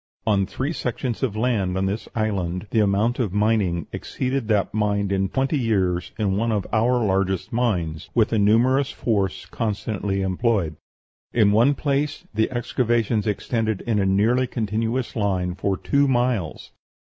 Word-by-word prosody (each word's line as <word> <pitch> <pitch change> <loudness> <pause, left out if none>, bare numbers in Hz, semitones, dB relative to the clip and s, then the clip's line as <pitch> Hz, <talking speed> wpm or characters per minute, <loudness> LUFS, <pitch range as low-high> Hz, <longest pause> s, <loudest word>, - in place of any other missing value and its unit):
On 100 -3 +2
three 140 - -3
sections 125 -3 -3
of 125 -6 -1
land 110 -6 0
on 95 - 0
this 100 +3 -3
island 95 -4 -1
the 115 - +2
amount 105 +4 +2
of 110 -7 -1
mining 105 -6 +1
exceeded 130 -2 -3
that 105 -3 +1
mined 100 -2 0
in 95 -1 +1
twenty 135 +5 0
years 95 -7 0
in 100 -3 0
one 115 +2 0
of 105 -4 -1
our 120 +1 +2
largest 95 0 0
mines, 90 -10 -1
with 115 -1 +3
a 110 - +3
numerous 125 +7 +3
force 100 -5 -1
constantly 105 -3 -2
employed. 95 -3 0 0.6
In 105 -4 +4
one 120 +7 +4
place 145 +1 -1
the 110 +1 +1
excavations 120 -3 0
extended 110 0 -1
in 115 -3 0
a 100 - +2
nearly 115 +7 +2
continuous 115 +2 -2
line 95 -5 0
for 95 +1 -1
two 140 +6 +2
miles. 120 - -1
110 Hz, 155 wpm, -23 LUFS, 95-120 Hz, 0.6 s, In